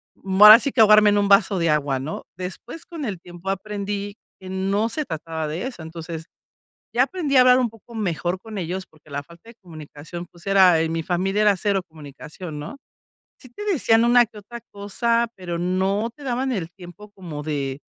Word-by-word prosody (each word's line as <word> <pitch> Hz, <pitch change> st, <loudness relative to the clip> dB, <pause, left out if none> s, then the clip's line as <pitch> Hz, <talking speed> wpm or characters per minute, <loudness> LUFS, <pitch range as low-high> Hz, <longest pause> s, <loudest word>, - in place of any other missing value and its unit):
mm, 190 Hz, 0 st, -3 dB
ahora 215 Hz, +2 st, +12 dB
sí 280 Hz, -, -1 dB
que 255 Hz, -, -4 dB
ahogarme 215 Hz, 0 st, +7 dB
en 205 Hz, -, +2 dB
un 205 Hz, 0 st, +2 dB
vaso 200 Hz, 0 st, +4 dB
de 165 Hz, -2 st, +1 dB
agua, 145 Hz, -3 st, 0 dB
¿no? 145 Hz, +5 st, -6 dB
Después, 210 Hz, -, -7 dB
con 330 Hz, -3 st, -8 dB
el 205 Hz, -8 st, -4 dB
tiempo, 175 Hz, +1 st, -9 dB
aprendí 200 Hz, +1 st, -4 dB, 0.2 s
que 190 Hz, -, -12 dB
no 195 Hz, +4 st, 0 dB
se 305 Hz, +5 st, -3 dB
trataba 160 Hz, -, -5 dB
de 160 Hz, +8 st, -4 dB
eso. 245 Hz, -10 st, -9 dB
Entonces 160 Hz, 0 st, -7 dB, 0.7 s
ya 245 Hz, -, +5 dB
aprendí 295 Hz, -2 st, -2 dB
a 255 Hz, -, +8 dB
hablar 250 Hz, 0 st, +6 dB
un 245 Hz, -2 st, +1 dB
poco 225 Hz, +1 st, -17 dB
mejor 180 Hz, -4 st, -2 dB
con 215 Hz, +1 st, -9 dB
ellos, 185 Hz, +1 st, -4 dB
porque 155 Hz, 0 st, -23 dB
la 140 Hz, 0 st, -4 dB
falta 170 Hz, +8 st, -17 dB
de 230 Hz, -, -14 dB
comunicación, 160 Hz, 0 st, -9 dB
pues 175 Hz, +2 st, -15 dB
era 190 Hz, -4 st, +5 dB
en 160 Hz, 0 st, 0 dB
mi 165 Hz, 0 st, -2 dB
familia 190 Hz, +4 st, 0 dB
era 205 Hz, -2 st, +4 dB
cero 195 Hz, 0 st, 0 dB
comunicación, 155 Hz, +2 st, -10 dB
¿no? 150 Hz, -, -7 dB, 0.6 s
Sí, 255 Hz, -, -15 dB
te 415 Hz, +13 st, -8 dB
decían 235 Hz, -, +3 dB
una 240 Hz, 0 st, +5 dB
que 215 Hz, -1 st, -16 dB
otra 235 Hz, +4 st, -10 dB
cosa, 230 Hz, +4 st, 0 dB
pero 175 Hz, -2 st, -5 dB
no 190 Hz, +5 st, 0 dB
te 295 Hz, -, -14 dB
daban 260 Hz, 0 st, -1 dB
el 180 Hz, -8 st, -3 dB
tiempo 180 Hz, +2 st, -13 dB
como 170 Hz, -7 st, -8 dB
de, 140 Hz, -3 st, -3 dB
195 Hz, 205 wpm, -22 LUFS, 165-225 Hz, 0.7 s, ahora